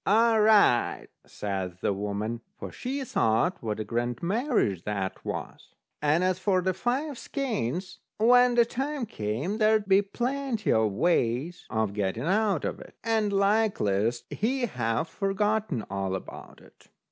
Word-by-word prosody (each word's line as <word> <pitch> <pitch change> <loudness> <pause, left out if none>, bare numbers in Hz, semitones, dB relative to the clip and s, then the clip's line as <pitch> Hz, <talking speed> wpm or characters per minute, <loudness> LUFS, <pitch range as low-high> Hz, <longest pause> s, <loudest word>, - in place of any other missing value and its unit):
"All 225 +2 +4
right," 210 - +4 0.2
says 95 -3 -4
the - - +1
woman; 105 +3 -3 0.2
for - - -7
she 270 +2 -4
thought 115 - +1
what 110 -2 -3
a - - -1
grand 120 +3 -3
marriage 205 - +1
that 100 -2 -4
was. - - -6 0.3
And 150 +4 +2
as 185 0 +1
for 185 -1 +1
the 185 +1 +1
five 255 - -2
skeins, 190 - -3 0.2
when 245 +2 +5
the 235 -1 +5
time 270 +2 -3
came, 140 - -3
there'd 215 -1 +3
be 195 +1 +5
plenty 240 +3 -2
of 110 -1 +3
ways 140 - 0
of 110 -2 -1
getting 100 +3 -2
out 195 -1 +1
of - - -3
it, - - -13
and 220 -2 +1
likeliest, 195 - +1
he'd 245 +2 0
have 120 +3 -1
forgotten 200 - -1
all 95 -1 -2
about 95 - -9
it. - - -21
185 Hz, 145 wpm, -27 LUFS, -, 0.3 s, when